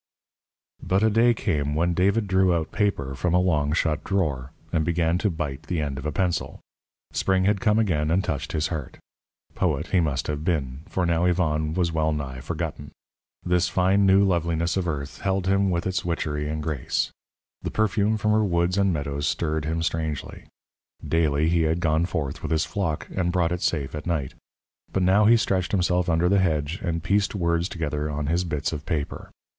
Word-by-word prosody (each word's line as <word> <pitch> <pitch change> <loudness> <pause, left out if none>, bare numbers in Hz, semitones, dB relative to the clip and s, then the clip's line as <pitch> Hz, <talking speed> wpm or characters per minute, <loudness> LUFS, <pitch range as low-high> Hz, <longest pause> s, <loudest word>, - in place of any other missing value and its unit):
But 95 +3 +1
a 110 - +4
day 115 +2 +4
came 75 -9 -1
when 85 +2 +1
David 100 +5 +2
drew 95 -2 +3
out 80 -2 -2
paper 85 -11 -1
from 85 +6 0
a - - +5
long 75 -5 +1
shut 80 -1 0
drawer, 75 -10 -1 0.2
and 80 - +2
began 85 +1 +1
to 105 - +1
bite 80 -6 -5
the 85 - -1
end 70 -3 -2
of 70 - -4
a - - -1
pencil. 90 +3 -1 0.5
Spring 95 -1 +1
had 100 -1 +2
come 105 +1 +3
again 80 -9 +1
and 90 +4 +2
touched 75 -9 -3
his 80 -1 0
heart. 75 -6 -5 0.6
Poet - - 0
he 95 - +4
must 75 -6 0
have 75 0 -3
been, 70 -7 -1
for 95 - 0
now 85 0 +2
Yvonne 80 -3 +1
was 90 -2 +1
well 80 -1 +1
nigh 70 -4 -4
forgotten. 70 +2 -5 0.6
This 90 -1 +2
fine 95 +2 +3
new 95 +1 +6
loveliness 85 -2 +1
of 95 -2 -1
earth 70 -3 -4
held 95 -1 0
him 100 +1 +2
with 85 -1 -1
its 95 0 -1
witchery 75 -3 -2
and 75 0 -3
grace. 75 -5 -1 0.5
The - - -3
perfume 110 0 +1
from 105 0 +1
her 110 0 +3
woods 90 0 +1
and 100 -1 +3
meadows 70 -2 -2
stirred 80 -2 -1
him 80 +1 -1
strangely. 80 -3 -3 0.6
Daily 80 -2 +2
had 80 -1 +2
he - - -4
gone 80 0 +1
forth 70 -7 -3
with - - -4
his 80 -1 +1
flock, 80 -7 -2
and 90 -2 0
brought 90 -2 +1
it 90 0 -2
safe 70 -5 -1
at 75 +3 -6
night. 75 -7 -1 0.6
But 95 - 0
now 95 +3 +4
he 115 +2 +7
stretched 95 -5 0
himself 90 -1 +1
under 85 +1 +2
the 100 +2 +3
hedge 80 -1 0
and 85 -4 -2
pieced 100 +3 +1
words 85 -1 0
together 75 -2 -3
on 75 0 -3
his 85 +4 +1
bits 80 -1 -2
of 75 -1 -6
paper. 80 -4 -3
85 Hz, 195 wpm, -25 LUFS, 75-95 Hz, 0.6 s, he